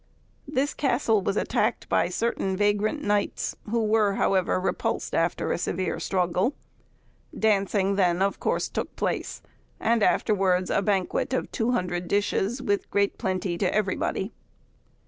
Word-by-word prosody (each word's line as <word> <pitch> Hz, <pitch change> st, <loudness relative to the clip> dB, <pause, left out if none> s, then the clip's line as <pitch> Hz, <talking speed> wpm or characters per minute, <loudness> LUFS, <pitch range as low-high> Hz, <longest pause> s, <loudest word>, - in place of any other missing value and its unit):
This 285 Hz, 0 st, 0 dB
castle 240 Hz, -6 st, +1 dB
was 195 Hz, +2 st, -1 dB
attacked -, -, 0 dB
by -, -, +2 dB
certain 195 Hz, -5 st, -1 dB
vagrant 210 Hz, +8 st, +1 dB
knights, 205 Hz, 0 st, 0 dB
who 230 Hz, +1 st, +1 dB
were, 210 Hz, -2 st, +2 dB
however, 185 Hz, -2 st, +2 dB
repulsed 185 Hz, -, -2 dB
after 165 Hz, +1 st, 0 dB
a -, -, -1 dB
severe 185 Hz, +1 st, -2 dB
struggle. 185 Hz, -, 0 dB, 0.8 s
Dancing 200 Hz, -2 st, +2 dB
then 180 Hz, -2 st, +3 dB
of 195 Hz, +1 st, 0 dB
course -, -, 0 dB
took -, -, -4 dB
place; -, -, -3 dB, 0.4 s
and 230 Hz, 0 st, +2 dB
afterwards 190 Hz, -3 st, +2 dB
a -, -, +2 dB
banquet 195 Hz, +4 st, 0 dB
of 255 Hz, -, -1 dB
200 180 Hz, -7 st, -1 dB
dishes, 205 Hz, +5 st, 0 dB
with 205 Hz, 0 st, 0 dB
great 200 Hz, 0 st, +1 dB
plenty 185 Hz, -2 st, -2 dB
to 185 Hz, -, +1 dB
everybody. 195 Hz, 0 st, -1 dB
200 Hz, 135 wpm, -26 LUFS, 185-220 Hz, 0.8 s, then